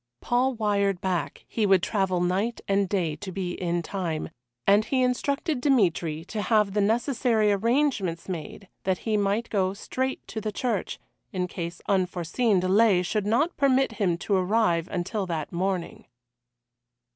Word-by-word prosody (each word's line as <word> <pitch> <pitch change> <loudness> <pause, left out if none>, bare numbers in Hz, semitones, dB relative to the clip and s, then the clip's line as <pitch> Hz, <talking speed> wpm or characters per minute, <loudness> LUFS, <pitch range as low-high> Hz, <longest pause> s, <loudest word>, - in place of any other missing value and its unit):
Paul 250 +2 +1
wired 200 -3 +1
back 185 -2 -3
he 215 -3 0
would 190 -2 +4
travel 190 -4 0
night 195 +7 0
and 195 -1 +1
day 175 -7 0
to 190 +4 -7
be 185 -1 -3
in 175 -1 -2
time, 170 -4 -3 0.4
and 205 +2 +5
he 255 +3 +1
instructed 275 +3 0
Dmitry 170 - +1
to 210 +3 -4
have 210 -2 +2
the 210 - +2
necessary 225 0 +2
arrangements 210 - 0
made 195 +3 -6 0.2
that 190 -1 +1
he 220 -2 +1
might 205 +3 0
go 190 -2 +1
straight 260 +5 -3
to 220 - -4
the 215 - -2
church, 230 -3 -2 0.3
in 180 -1 -1
case 170 -1 -6
unforeseen 190 +3 +1
delay 190 0 +4
should 205 +3 -1
not 290 +11 +2
permit 270 -1 +3
him 180 -6 0
to 200 - -2
arrive 185 -3 +2
until 190 +3 -3
that 160 -3 -3
morning. 185 0 -3
200 Hz, 155 wpm, -26 LUFS, 180-225 Hz, 0.4 s, and